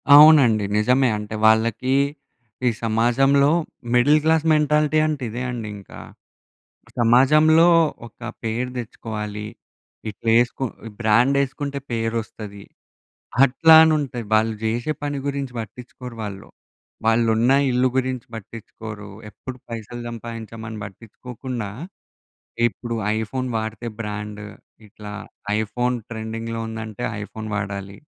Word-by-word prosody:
అవునండి. 140 -9 +7
నిజమే. 125 +4 +3
అంటే 105 +1 -6
వాళ్ళకి 115 +4 +3 0.7
ఈ - - +6
సమాజంలో 130 +5 +3 0.4
మిడిల్ 145 +5 +5
క్లాస్ 160 0 +3
మెంటాలిటీ 150 0 +2
అంటే 150 -4 -2
ఇదే 120 +3 -4
అండి 115 -3 -5
ఇంకా. 100 - -12 1.0
సమాజంలో 155 +8 +5 0.4
ఒక 115 - -17 0.2
పేరు 120 +3 -2
తెచ్చుకోవాలి. 105 -2 -5 0.6
ఇట్లా 115 +2 -7
ఏసుకొ 120 +2 -1 0.4
బ్రాండేసుకుంటే 140 +5 +2
పేరు 115 0 -1
వస్తది. 105 -2 -10 0.8
అట్లా 160 +5 +5
అని 160 -1 +5
ఉంటాయి. 125 -5 -4
వాళ్ళు 110 +1 +3
జేషే 120 +7 -1
పని 145 -1 -2
గురించి 140 -2 -3
పట్టించుకోరు 125 +2 -9
వాళ్ళు. 100 -2 -7 0.6
వాళ్ళున్న 115 +2 +3 0.2
ఇల్లు 125 +1 +3
గురించి 130 -2 -1
పట్టించుకోరు. 110 -1 -9 0.2
ఎప్పుడు 130 +3 -9
పైసలు 115 +1 -7
సంపాదించామని 115 -1 -7
పట్టించుకోకుండా 115 +2 -7 1.0
ఇప్పుడు 120 0 -5 0.2
ఐఫోన్ 130 +4 -3
వాడితే 110 +2 -4
బ్రాండ్. 105 -1 -5 0.5
ఇట్లా 105 0 -10 0.5
ఐఫోన్ 125 +3 -1
ట్రెండింగ్‌లో 115 0 -5
ఉందంటే, 110 +1 -6 0.2
ఐఫోన్ 110 +1 -7
వాడాలి. 100 -1 -4
115 Hz, 105 wpm, -22 LUFS, 110-130 Hz, 1.0 s, అవునండి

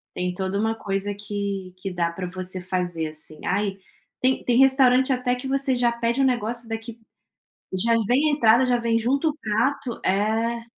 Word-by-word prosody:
Tem 180 0 -2
toda 190 +2 -2
uma 225 +1 0
coisa 200 -1 -2
que 200 -2 -4
que 190 +1 -5
dá 170 -2 -1
pra 180 +2 -5
você 185 0 -3
fazer, 175 -3 -2
assim. 155 0 -5
Ai, 195 0 -1 0.4
tem 260 +1 +2
tem 245 +1 +3
restaurante 265 -1 +5
até 250 -1 +1
que 250 +2 -6
você 275 -1 +1
já 245 -1 +2
pede 235 +2 -1
um - - +4
negócio 235 -2 -1
daqui 225 +1 -6 0.7
já 230 +5 +2
vem 280 +5 +3
a - - +2
entrada, 240 -2 +4
já 245 -1 +2
vem 230 -1 +1
junto 275 +7 +1
o 300 - -5
prato 235 +3 -1
é. 225 +4 0
225 Hz, 185 wpm, -24 LUFS, 190-250 Hz, 0.7 s, restaurante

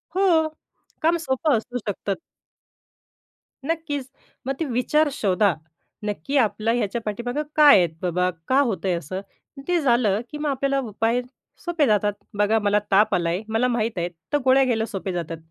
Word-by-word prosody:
हो, 350 -5 +3 0.5
काम 330 +2 +3
सोपं 265 +1 +2
असू 245 +3 -5
शकतात. 200 -1 -2 1.5
नक्कीच! 295 -4 -2 0.4
मग 270 - +1
ते 325 - 0
विचार 290 +4 +1
शोधा. 195 -1 +2 0.5
नक्की 210 +7 -2
आपला 220 -2 +1
ह्याच्या 235 +1 -2
पाठीमागं 240 +7 -3
काय 295 -5 +8
आहेत 175 -3 +3
बाबा? 180 0 +1 0.2
का 265 - +4
होत 225 -8 -1
आहे 185 - +2
असं? 175 +3 -4 0.5
ते 355 -1 +2
झालं 235 -7 +2
की 300 - -6
मग 295 0 -2
आपल्याला 275 0 0
उपाय 225 +4 0 0.4
सोपे 340 -4 +2
जातात. 210 -1 +2 0.3
बघा 210 +2 +3
मला 205 0 +2
ताप 210 +2 +4
आलाय 170 -1 0
आहे 195 - -4
मला 235 +3 +2
माहीत 230 -3 -1
आहेत 175 0 -2 0.2
तर - - +5
गोळ्या 265 +1 +5
घ्यायला 225 -3 +1
सोप्या 195 -4 -4
जातात, 165 -2 -4
230 Hz, 165 wpm, -23 LUFS, 200-280 Hz, 1.5 s, काय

